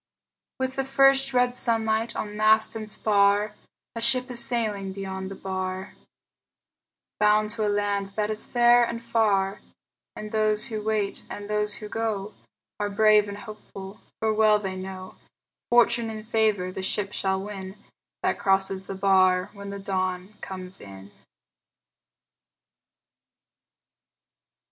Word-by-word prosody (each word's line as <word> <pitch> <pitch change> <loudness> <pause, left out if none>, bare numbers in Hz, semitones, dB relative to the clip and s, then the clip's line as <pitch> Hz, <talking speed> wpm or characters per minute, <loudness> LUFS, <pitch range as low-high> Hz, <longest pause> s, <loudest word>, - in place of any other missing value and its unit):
With 260 0 -3
the 270 - 0
first 270 0 +4
red 250 -1 +1
sunlight 225 -1 +1
on 210 -1 -5
mast 220 +1 +4
and 215 -1 -6
spar 205 0 +2 0.4
A 230 - -4
ship 255 +1 +3
is 235 -1 +6
sailing 210 -5 -1
beyond 190 -1 -6
the 195 - -7
bar, 185 0 -5 1.3
Bound 210 0 +3
to 215 -1 0
a - - +1
land 205 -1 -1
that 210 0 -1
is 215 0 -1
fair 240 0 +4
and 235 0 -3
far; 210 -4 0 0.5
And 215 0 -8
those 215 -1 +3
who 215 -2 -4
wait 210 -2 -1
and 205 0 -7
those 210 0 +3
who 210 - -7
go 215 -2 -3 0.5
Are 205 0 -1
brave 210 0 +4
and 200 0 -7
hopeful, 200 -1 -11 0.2
for 220 0 0
well 215 -1 +4
they 190 -2 -5
know 185 0 -8 0.5
Fortune 235 -1 +3
and 215 0 -8
favor 215 -5 0
the 190 - -6
ship 200 +1 -2
shall 190 0 -1
win 195 -1 -8 0.5
That - - 0
crosses 195 0 +1
the 195 - -5
bar 185 -1 +2
when 200 -1 -9
the 200 - -6
dawn 185 0 -3
comes 185 0 -8
in. 100 0 -12
210 Hz, 140 wpm, -25 LUFS, 195-220 Hz, 1.3 s, is